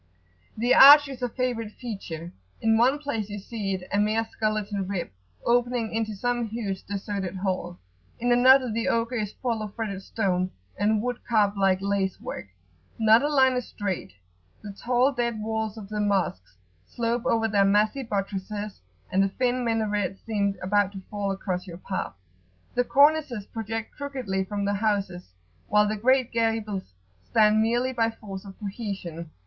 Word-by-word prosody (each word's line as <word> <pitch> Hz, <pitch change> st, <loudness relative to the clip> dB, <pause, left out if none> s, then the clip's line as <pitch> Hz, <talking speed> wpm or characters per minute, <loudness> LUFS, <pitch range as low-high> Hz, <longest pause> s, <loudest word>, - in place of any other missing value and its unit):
The 240 Hz, +3 st, +3 dB
arch 290 Hz, +2 st, +10 dB
is 265 Hz, -2 st, -8 dB
a 245 Hz, -, 0 dB
favourite 230 Hz, -3 st, -2 dB
feature: 175 Hz, -8 st, -7 dB, 0.3 s
in 225 Hz, 0 st, +3 dB
one 250 Hz, +5 st, +4 dB
place 230 Hz, -8 st, -3 dB
you 205 Hz, -, -5 dB
see 200 Hz, -1 st, -3 dB
it 180 Hz, -1 st, -8 dB
a 205 Hz, -, +3 dB
mere 215 Hz, +2 st, +2 dB
skeleton 215 Hz, -3 st, -2 dB
rib 185 Hz, -, -3 dB, 0.3 s
opening 240 Hz, -2 st, +1 dB
into 220 Hz, -1 st, -1 dB
some 240 Hz, +2 st, -1 dB
huge 205 Hz, -4 st, -4 dB
deserted 195 Hz, -2 st, -4 dB
hall; 185 Hz, -2 st, -3 dB, 0.4 s
in 245 Hz, +1 st, +1 dB
another 255 Hz, 0 st, +6 dB
the 230 Hz, +1 st, -1 dB
ogre 230 Hz, +2 st, 0 dB
is 210 Hz, -2 st, -2 dB
full 235 Hz, -4 st, -2 dB
of 210 Hz, -2 st, -6 dB
fretted 205 Hz, -4 st, -4 dB
stone 185 Hz, -3 st, -1 dB, 0.3 s
and 210 Hz, +2 st, +1 dB
wood 245 Hz, -1 st, -3 dB
carved 210 Hz, -3 st, +2 dB
like 195 Hz, -1 st, +2 dB
lace 200 Hz, -1 st, 0 dB
work. -, -, -6 dB, 0.5 s
Not 220 Hz, 0 st, +6 dB
a 290 Hz, -, +1 dB
line 265 Hz, -3 st, +4 dB
is 250 Hz, -1 st, -2 dB
straight, 190 Hz, -, -4 dB, 0.5 s
the 205 Hz, -, -6 dB
tall 250 Hz, +5 st, +2 dB
dead 235 Hz, -3 st, -1 dB
walls 220 Hz, 0 st, -3 dB
of 210 Hz, -3 st, -8 dB
the 210 Hz, 0 st, -3 dB
Mosques 180 Hz, -, -1 dB, 0.3 s
slope 235 Hz, 0 st, -2 dB
over 225 Hz, -1 st, +2 dB
their 200 Hz, -2 st, +3 dB
massy 210 Hz, +6 st, +2 dB
buttresses, 205 Hz, -1 st, -4 dB, 0.3 s
and 190 Hz, -, +3 dB
the 195 Hz, -, +2 dB
thin 250 Hz, +4 st, 0 dB
minarets 210 Hz, -4 st, -1 dB
seem 200 Hz, -3 st, 0 dB
about 200 Hz, +1 st, +2 dB
to 195 Hz, -, -7 dB
fall 205 Hz, -1 st, -2 dB
across 190 Hz, -1 st, -3 dB
your 170 Hz, -2 st, -8 dB
path. 185 Hz, -, -4 dB, 0.6 s
The 245 Hz, -, +2 dB
cornices 280 Hz, -5 st, +3 dB
project 225 Hz, 0 st, -5 dB
crookedly 255 Hz, -10 st, -3 dB
from 200 Hz, 0 st, -3 dB
the 200 Hz, -, +1 dB
houses, 200 Hz, -, -1 dB, 0.4 s
while 210 Hz, 0 st, +4 dB
the 215 Hz, -, -1 dB
great 255 Hz, +3 st, +2 dB
gables 225 Hz, -, -1 dB, 0.4 s
stand 215 Hz, 0 st, +4 dB
merely 240 Hz, +3 st, +1 dB
by 230 Hz, -2 st, +2 dB
force 205 Hz, -3 st, -9 dB
of 195 Hz, -1 st, -11 dB
cohesion. 195 Hz, -6 st, -6 dB
215 Hz, 165 wpm, -26 LUFS, 195-235 Hz, 0.6 s, arch